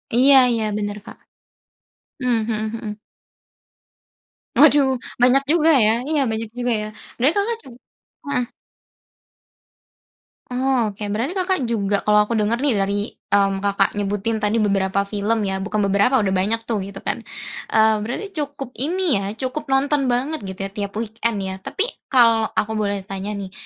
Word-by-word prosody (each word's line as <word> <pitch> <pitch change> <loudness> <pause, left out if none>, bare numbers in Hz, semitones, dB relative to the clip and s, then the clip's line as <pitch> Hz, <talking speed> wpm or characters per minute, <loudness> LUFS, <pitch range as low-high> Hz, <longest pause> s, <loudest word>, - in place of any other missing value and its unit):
Iya 270 +3 +6 0.2
iya, 225 -2 0
benar, 205 0 -3
Kak. - - -11 1.0
Mmm, 240 -3 +1
mhm 215 0 -1
mhm. 215 -2 -6 1.6
Waduh, 290 -2 +6 0.3
banyak 260 +2 +5
juga, 325 -1 +4 0.2
ya. 215 - +5 0.2
Iya, 305 -3 +2
banyak 220 0 -3
juga, 245 0 -1
ya. 215 - -4 0.3
Berarti 275 +9 +2
Kakak 450 +3 +1
ju - - -15 0.6
heeh. 250 -3 0 2.0
Oh, 250 -2 +1
oke. 210 - -8
Berarti 240 - -1
Kakak 370 -2 +1
juga 205 -3 0
kalau 210 0 +4
aku 230 - -3
denger 215 +3 +1
nih, 280 -5 +3
dari, 200 +1 0
mmm, 195 -1 0
Kakak 200 -1 +1
nyebutin 205 +2 -1
tadi 210 +2 +1
beberapa 200 -2 +1
film, 210 +2 -1
ya. 190 0 -2
Bukan 210 +2 -3
beberapa, 200 +6 +3
udah 190 -1 0
banyak 215 +5 0
tuh, 220 -3 -1
gitu 195 0 -8
kan. - - -2 0.5
Eee, 220 0 +4
berarti 320 - -4
cukup 285 -4 -4
ini 330 - +1
ya, 195 - -4
cukup 265 +5 -4
nonton 275 0 +2
banget, 270 +6 0
gitu 190 +1 -8
ya, - - -4
tiap 200 0 -5
weekend, 230 0 -2
ya. 190 0 -3
Tapi, 415 - -1 0.2
kalau 230 -4 +4
aku 220 +1 0
boleh 205 -2 -1
tanya, 195 +1 -5
nih. 195 -2 -6
220 Hz, 155 wpm, -21 LUFS, 205-265 Hz, 2.0 s, Iya